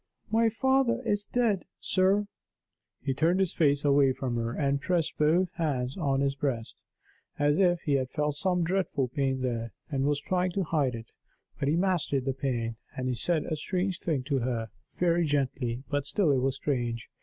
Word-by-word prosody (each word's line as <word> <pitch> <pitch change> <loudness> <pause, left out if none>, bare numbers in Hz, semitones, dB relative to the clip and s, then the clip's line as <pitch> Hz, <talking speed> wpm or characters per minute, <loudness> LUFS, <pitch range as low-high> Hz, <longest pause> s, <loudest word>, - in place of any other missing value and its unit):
"My 225 +1 +4
father 265 +2 +2
is 205 0 0
dead, 230 -6 +1
sir." 195 +2 +2 0.8
He 135 0 0
turned 165 +7 +2
his 190 -3 +1
face 145 -3 +2
away 140 -2 +4
from 125 -2 -3
her, 115 0 -1
and 140 +1 0
pressed 170 -1 0
both 170 +4 +3
hands 135 -6 -1
on 140 -6 0
his 140 0 +1
breast, 135 -5 -3 0.6
as 145 +2 +2
if 175 -3 +3
he 150 - -2
had 130 -2 +1
felt 150 +1 -1
some 180 +3 +1
dreadful 165 -7 0
pain 130 0 -1
there, 115 -4 -2 0.2
and 135 -1 0
was 145 0 +1
trying 180 +3 0
to 195 - 0
hide 145 -7 0
it. 115 0 -9 0.5
But 140 - 0
he 150 - +3
mastered 170 -7 +1
the 135 - 0
pain; 120 -4 -2 0.2
and 130 0 -2
he - - 0
said 160 +6 +1
a 155 - -2
strange 180 +4 -2
thing 150 -6 -1
to 140 0 0
her 115 -3 -2 0.3
very 175 -1 +2
gently, 130 -4 -1
but 145 -1 -2
still 155 +2 +2
it 135 - +3
was 135 +1 0
strange. 120 -5 -2
145 Hz, 190 wpm, -28 LUFS, 130-180 Hz, 0.8 s, My